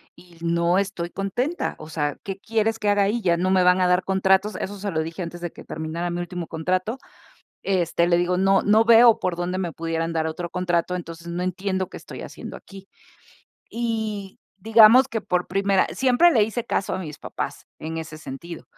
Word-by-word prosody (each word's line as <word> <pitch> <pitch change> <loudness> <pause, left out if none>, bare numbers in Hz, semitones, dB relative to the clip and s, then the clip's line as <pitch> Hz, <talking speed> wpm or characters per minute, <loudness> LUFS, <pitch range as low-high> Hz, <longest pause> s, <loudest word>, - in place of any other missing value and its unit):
y 175 -2 -18
no 170 +2 +1
estoy 190 -3 -3
contenta, 240 - -2
o 155 - -10
sea, 145 -2 -2
¿qué 195 -1 -5
quieres 225 +1 0
que 210 - 0
haga 205 0 +3
ahí?, 220 +4 0
ya 175 -3 +2
no 185 +2 0
me 185 -1 +4
van 180 +1 +4
a 180 - +3
dar 180 +1 +3
contratos", 190 +2 +2
eso 205 +1 -5
se 200 0 -3
lo 160 - 0
dije 165 +3 -6
antes 175 +1 -8
de 175 -1 -4
que - - -12
terminara 160 +2 -4
mi 175 - -3
último 175 -1 -5
contrato. 185 +8 -2 0.7
Este, 175 -3 +1
le 170 -1 +3
digo: 175 +1 +1
"No 195 +1 +3
no 215 +2 +5
veo 230 0 +7
por 180 -2 -1
dónde 175 +2 -3
me 175 -3 -2
pudieran 165 0 -2
dar 160 -1 0
otro 175 +2 -5
contrato, 180 0 -1
entonces 170 -1 -8
no 170 +1 -3
entiendo 190 +1 -2
qué - - -9
estoy - - -10
haciendo - - -8
aquí", 195 0 -14 0.8
y 220 -4 -3 0.2
digamos 225 +5 +7
que 225 -1 -3
por 180 -2 -1
primera, 195 0 +2
siempre 265 +6 +4
le 230 -9 +4
hice 225 +3 -2
caso 195 -4 -1
a - - -3
mis 155 -5 -7
papás - - -6
en 160 +1 -5
ese 160 -1 -7
sentido, 155 +3 -9
185 Hz, 205 wpm, -23 LUFS, 170-205 Hz, 0.8 s, veo